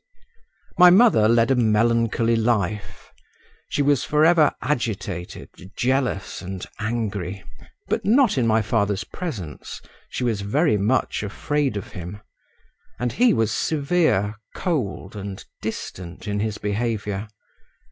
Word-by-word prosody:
My 180 Hz, 0 st, +10 dB
mother 190 Hz, -, +6 dB
led 115 Hz, +2 st, +4 dB
a -, -, +4 dB
melancholy 115 Hz, 0 st, +2 dB
life; 105 Hz, -3 st, -1 dB, 0.6 s
she 145 Hz, -, 0 dB
was 145 Hz, -3 st, +2 dB
for 150 Hz, +1 st, +3 dB
ever 160 Hz, -3 st, +5 dB
agitated, 105 Hz, -, -3 dB, 0.3 s
jealous 130 Hz, -6 st, -1 dB
and 95 Hz, -1 st, -6 dB
angry, 105 Hz, -4 st, -3 dB, 0.4 s
but -, -, -1 dB
not 240 Hz, +2 st, +4 dB
in 125 Hz, -4 st, +1 dB
my 110 Hz, 0 st, +3 dB
father's 105 Hz, -1 st, 0 dB
presence; 110 Hz, -, -6 dB, 0.3 s
she -, -, -4 dB
was 115 Hz, -4 st, 0 dB
very 140 Hz, +7 st, +2 dB
much 110 Hz, +7 st, +1 dB
afraid 135 Hz, +4 st, -1 dB
of 100 Hz, -, -6 dB
him, 90 Hz, +2 st, -7 dB, 0.8 s
and 125 Hz, -1 st, -1 dB
he 245 Hz, 0 st, +4 dB
was 115 Hz, -, +1 dB
severe, 145 Hz, -, +1 dB, 0.2 s
cold, 140 Hz, -, -2 dB
and 100 Hz, -1 st, -7 dB, 0.2 s
distant 90 Hz, +3 st, -6 dB
in 105 Hz, 0 st, -1 dB
his 105 Hz, 0 st, -2 dB
behaviour…. 105 Hz, -1 st, -2 dB
115 Hz, 125 wpm, -23 LUFS, 100-135 Hz, 0.8 s, My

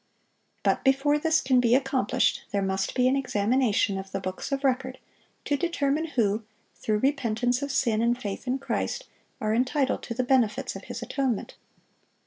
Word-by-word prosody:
But -, -, +1 dB
before 275 Hz, +2 st, +3 dB
this 320 Hz, 0 st, +2 dB
can 260 Hz, -1 st, +3 dB
be 240 Hz, 0 st, +4 dB
accomplished, 265 Hz, -1 st, +1 dB
there 200 Hz, -1 st, 0 dB
must 190 Hz, 0 st, -1 dB
be 250 Hz, -1 st, +3 dB
an 260 Hz, -, +3 dB
examination 220 Hz, -5 st, +1 dB
of 190 Hz, 0 st, -8 dB
the 195 Hz, -, -2 dB
books 185 Hz, +7 st, -5 dB
of 275 Hz, 0 st, -1 dB
record 260 Hz, -1 st, 0 dB, 0.5 s
to 290 Hz, -, +1 dB
determine 310 Hz, -2 st, 0 dB
who, 225 Hz, -6 st, 0 dB, 0.3 s
through 215 Hz, -1 st, -1 dB
repentance 245 Hz, -1 st, 0 dB
of 280 Hz, 0 st, -3 dB
sin 225 Hz, -5 st, +1 dB
and 240 Hz, +1 st, +1 dB
faith 205 Hz, +1 st, -5 dB
in 255 Hz, +2 st, +1 dB
Christ, -, -, -3 dB, 0.3 s
are 215 Hz, 0 st, 0 dB
entitled 260 Hz, +3 st, +1 dB
to 230 Hz, -, -6 dB
the 255 Hz, -, 0 dB
benefits 245 Hz, -5 st, +1 dB
of -, -, -8 dB
His -, -, -6 dB
atonement. 265 Hz, -6 st, -2 dB
255 Hz, 170 wpm, -27 LUFS, 215-275 Hz, 0.5 s, be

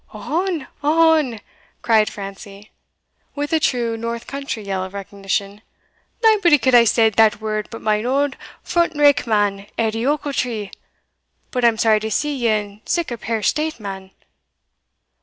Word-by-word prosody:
'" -, -, -26 dB
"Ohon! 320 Hz, -, -2 dB, 0.2 s
ohon!" 310 Hz, -6 st, +3 dB, 0.4 s
cried 220 Hz, -2 st, +3 dB
Francie, 200 Hz, +1 st, -10 dB, 0.6 s
with 290 Hz, +2 st, -3 dB
a 320 Hz, -, +4 dB
true 240 Hz, -6 st, 0 dB
north 230 Hz, +1 st, -5 dB
country 275 Hz, -5 st, -5 dB
yell 195 Hz, -2 st, -3 dB
of 190 Hz, +1 st, -8 dB
recognition, 200 Hz, +1 st, -4 dB, 0.6 s
"naebody 400 Hz, -8 st, +5 dB
could 260 Hz, 0 st, +1 dB
hae 240 Hz, -1 st, +7 dB
said 225 Hz, -1 st, +3 dB
that 220 Hz, -1 st, +4 dB
word 215 Hz, -1 st, -3 dB
but 225 Hz, -, -9 dB
my 215 Hz, 0 st, +1 dB
auld 275 Hz, +2 st, 0 dB, 0.3 s
front 340 Hz, -2 st, 0 dB
rank 290 Hz, -4 st, +4 dB
man, 205 Hz, -2 st, 0 dB
Edie 225 Hz, +2 st, 0 dB
Ochiltree! 255 Hz, -8 st, -2 dB, 0.8 s
But 250 Hz, -2 st, -2 dB
I'm 230 Hz, -2 st, +4 dB
sorry 220 Hz, -1 st, +3 dB
to 220 Hz, +1 st, -4 dB
see 295 Hz, +7 st, -1 dB
ye 240 Hz, -3 st, 0 dB
in 210 Hz, -1 st, -1 dB
sic 340 Hz, -6 st, -1 dB
a 240 Hz, -, -3 dB
peer 225 Hz, -1 st, -3 dB
state, 305 Hz, +5 st, 0 dB
man." 195 Hz, -2 st, -7 dB
230 Hz, 155 wpm, -20 LUFS, 210-285 Hz, 0.8 s, hae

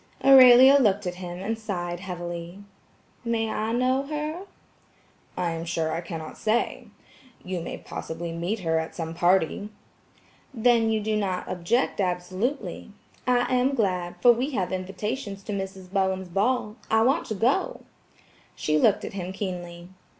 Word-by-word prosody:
Aurelia 265 Hz, 0 st, +9 dB
looked 205 Hz, -5 st, +2 dB
at 180 Hz, -, -2 dB
him 175 Hz, -1 st, -6 dB
and 220 Hz, +4 st, -3 dB
sighed 175 Hz, -5 st, -4 dB
heavily. 175 Hz, 0 st, -6 dB, 0.6 s
"May 225 Hz, -2 st, -1 dB
I 220 Hz, +1 st, -2 dB
know 255 Hz, +3 st, +2 dB
her?" 305 Hz, +5 st, -4 dB, 0.9 s
"I 175 Hz, -2 st, 0 dB
am 165 Hz, 0 st, -4 dB
sure, 165 Hz, -1 st, -1 dB
I 165 Hz, +2 st, -2 dB
cannot 165 Hz, -2 st, -7 dB
say. 225 Hz, +2 st, 0 dB, 0.6 s
You 180 Hz, -1 st, -3 dB
may -, -, -5 dB
possibly 165 Hz, +1 st, -6 dB
meet 175 Hz, +6 st, -3 dB
her 160 Hz, -2 st, +1 dB
at 160 Hz, -, -5 dB
some 165 Hz, -1 st, -4 dB
party." 180 Hz, +3 st, +1 dB, 0.9 s
"Then 230 Hz, -1 st, +3 dB
you 220 Hz, -1 st, +1 dB
do 215 Hz, +1 st, -1 dB
not 190 Hz, -3 st, -2 dB
object 195 Hz, +6 st, 0 dB
absolutely. 185 Hz, +9 st, -2 dB, 0.4 s
I 245 Hz, -1 st, +3 dB
am 255 Hz, +2 st, +2 dB
glad, 180 Hz, -6 st, -1 dB
for 245 Hz, -, +9 dB
we 245 Hz, +4 st, 0 dB
have 185 Hz, -4 st, -1 dB
invitations 195 Hz, +3 st, -4 dB
to 210 Hz, -, -5 dB
Mrs. 190 Hz, -2 st, -6 dB
Bowen's 190 Hz, -1 st, 0 dB
ball. 210 Hz, +3 st, 0 dB
I 220 Hz, 0 st, +4 dB
want 260 Hz, +4 st, +2 dB
to 215 Hz, -, -3 dB
go." 280 Hz, -, 0 dB, 0.7 s
She 155 Hz, 0 st, +1 dB
looked 205 Hz, +5 st, +3 dB
at -, -, -7 dB
him 185 Hz, -2 st, -4 dB
keenly. 175 Hz, -3 st, -6 dB
195 Hz, 150 wpm, -26 LUFS, 175-230 Hz, 0.9 s, Aurelia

